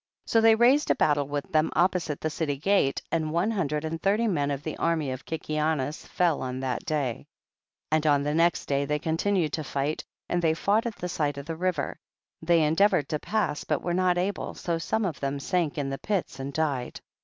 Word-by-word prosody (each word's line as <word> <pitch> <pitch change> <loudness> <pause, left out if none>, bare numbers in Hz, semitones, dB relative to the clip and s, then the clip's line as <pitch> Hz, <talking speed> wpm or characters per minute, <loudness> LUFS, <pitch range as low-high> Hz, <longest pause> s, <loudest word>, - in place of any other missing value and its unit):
16. - - -13
So 225 - +6
they 225 0 +6
raised 255 +6 +4
a - - +4
battle 145 -2 +2
with 145 0 -4
them 155 0 +3
opposite 175 -3 +1
the 155 - -1
city 145 -2 -2
gate, 160 -3 +1
and 160 -2 0
one 175 +7 +1
hundred 155 -7 -1
and 165 +1 -4
thirty 210 +4 +2
men 145 -8 0
of 140 0 -3
the 155 - -4
army 160 -5 0
of 130 0 -6
Kikianus 155 -2 -2
fell 175 -4 +1
on 130 0 -3
that 130 -2 -2
day. 145 -5 0
17. - - -16 0.7
And 155 0 +2
on 145 -1 +4
the 150 +1 -1
next 165 +1 +2
day 140 0 0
they 150 +1 0
con 160 +2 -1
tinued 185 -5 +1
to 155 - -2
fight 140 +2 -2 0.2
and 175 - 0
they 160 -2 +2
fought 210 +7 +1
at 225 - -5
the 180 - -4
side 145 -4 -1
of 140 - -6
the 165 +1 -4
river; 180 +2 -2 0.4
they 165 0 +3
endeavored 160 -1 +3
to 150 - -1
pass 205 -8 -1
but - - -1
were 175 - -1
not 180 0 +2
able, 185 +2 -2
so 170 -1 -2
some 220 +6 -1
of 170 -6 -3
them 140 0 -2
sank 170 0 -1
in 140 -2 -2
the 135 - -4
pits 195 -8 -2
and 135 +1 -4
died. 140 -5 -2
160 Hz, 225 wpm, -27 LUFS, 145-180 Hz, 0.7 s, So